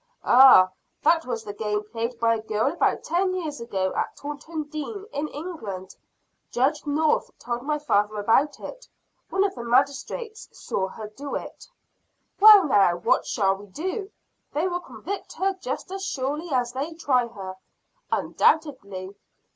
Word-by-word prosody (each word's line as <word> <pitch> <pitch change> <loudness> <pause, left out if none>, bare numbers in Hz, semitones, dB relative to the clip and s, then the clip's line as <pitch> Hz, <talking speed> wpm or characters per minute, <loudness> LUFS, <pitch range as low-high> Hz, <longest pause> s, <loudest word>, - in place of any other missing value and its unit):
"Ah, 245 -8 +8 0.3
that 330 -1 +4
was 230 -3 -3
the 205 -2 -6
game 210 0 -2
played 230 +1 -3
by 230 0 +3
a 225 - -2
girl 220 +6 0
about 345 - +1
ten 370 +3 0
years 305 -8 -4
ago 190 -5 -2
at - - -2
Taunton 295 +2 -5
Dean, 310 +8 -6
in 295 +2 -2
England. 225 - -7 0.5
Judge 290 +5 0
North 300 +1 +1
told 240 0 -4
my 300 +3 -1
father 210 -8 +1
about 245 +8 +2
it. - - -9 0.4
One 385 - +2
of 400 - 0
the 240 - -7
magistrates 280 - -1
saw 190 - -3
her 215 +2 -8
do 280 +6 -6
it." - - -7 0.7
"Well, 415 -2 +9
now, 195 -8 +4
what 175 - +1
shall 195 -3 +2
we 205 +1 -12
do? 375 - -4 0.4
They 310 +5 +1
will 355 -1 -2
convict 345 - -7
her 390 +1 0
just - - -4
as 385 0 -5
surely 295 +1 -3
as 245 -2 0
they 285 +6 -3
try 255 -7 +1
her." 195 -5 -8 0.6
"Undoubtedly!" 200 - 0
275 Hz, 155 wpm, -25 LUFS, 220-325 Hz, 0.7 s, Well